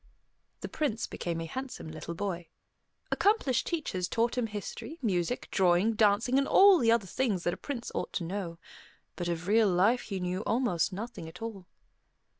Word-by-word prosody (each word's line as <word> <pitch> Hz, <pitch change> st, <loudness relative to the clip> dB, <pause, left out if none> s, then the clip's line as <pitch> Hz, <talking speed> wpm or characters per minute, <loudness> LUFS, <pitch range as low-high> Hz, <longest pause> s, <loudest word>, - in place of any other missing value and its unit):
The -, -, -4 dB
Prince 255 Hz, -8 st, -1 dB
became 170 Hz, -1 st, -4 dB
a -, -, -3 dB
handsome 260 Hz, +3 st, -6 dB
little 160 Hz, +2 st, -6 dB
boy. 175 Hz, -3 st, -3 dB, 0.6 s
Accomplished 395 Hz, -, +2 dB
teachers 235 Hz, -, -2 dB
taught 230 Hz, +4 st, 0 dB
him 245 Hz, -2 st, 0 dB
history, 215 Hz, -, -6 dB
music, 185 Hz, +1 st, 0 dB
drawing, 185 Hz, +3 st, +3 dB
dancing, 220 Hz, +4 st, +3 dB
and 275 Hz, -, 0 dB
all 390 Hz, -2 st, +7 dB
the 230 Hz, -4 st, +4 dB
other 230 Hz, -3 st, +3 dB
things 195 Hz, -2 st, -1 dB
that 175 Hz, -, +1 dB
a -, -, -3 dB
prince 250 Hz, -5 st, -5 dB
ought -, -, -3 dB
to 180 Hz, -, -2 dB
know. 170 Hz, -1 st, -4 dB, 0.6 s
But 175 Hz, -, -3 dB
of 170 Hz, +1 st, -3 dB
real 215 Hz, 0 st, +4 dB
life 200 Hz, +7 st, +3 dB
he 195 Hz, -3 st, -5 dB
knew 180 Hz, +1 st, -2 dB
almost 215 Hz, -7 st, +1 dB
nothing 205 Hz, -4 st, -6 dB
at 180 Hz, +7 st, -10 dB
all. 200 Hz, -5 st, -6 dB
205 Hz, 175 wpm, -30 LUFS, 180-240 Hz, 0.6 s, all